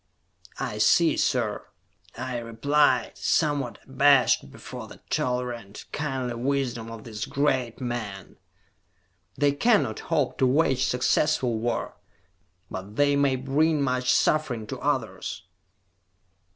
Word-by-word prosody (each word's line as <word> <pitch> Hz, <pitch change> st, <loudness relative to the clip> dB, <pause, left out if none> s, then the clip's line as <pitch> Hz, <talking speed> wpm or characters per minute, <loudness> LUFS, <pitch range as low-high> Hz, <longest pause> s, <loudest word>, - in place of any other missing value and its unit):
"I 105 Hz, -, -3 dB
see, 160 Hz, +10 st, +4 dB
sir," 115 Hz, -5 st, 0 dB, 0.5 s
I 125 Hz, 0 st, -3 dB
replied, 140 Hz, +6 st, +2 dB
somewhat 140 Hz, -8 st, +1 dB
abashed 135 Hz, 0 st, +4 dB
before -, -, -9 dB
the -, -, -13 dB
tolerant, 125 Hz, -5 st, -2 dB
kindly 130 Hz, -5 st, -2 dB
wisdom 120 Hz, -2 st, -2 dB
of 115 Hz, -1 st, -9 dB
this 110 Hz, -2 st, -5 dB
great 130 Hz, -5 st, 0 dB
man. 115 Hz, -7 st, -5 dB, 1.0 s
"They 145 Hz, -1 st, +3 dB
cannot 215 Hz, +10 st, +2 dB
hope 150 Hz, -5 st, 0 dB
to 130 Hz, -, +4 dB
wage 135 Hz, -1 st, +2 dB
successful 125 Hz, -1 st, +1 dB
war, 120 Hz, +1 st, -2 dB, 0.7 s
but 95 Hz, +3 st, -7 dB
they 145 Hz, +2 st, +3 dB
may 140 Hz, -2 st, +3 dB
bring 145 Hz, +4 st, +1 dB
much 125 Hz, -1 st, +1 dB
suffering 130 Hz, -8 st, +1 dB
to -, -, -6 dB
others." -, -, -2 dB
130 Hz, 110 wpm, -26 LUFS, 115-145 Hz, 1.0 s, see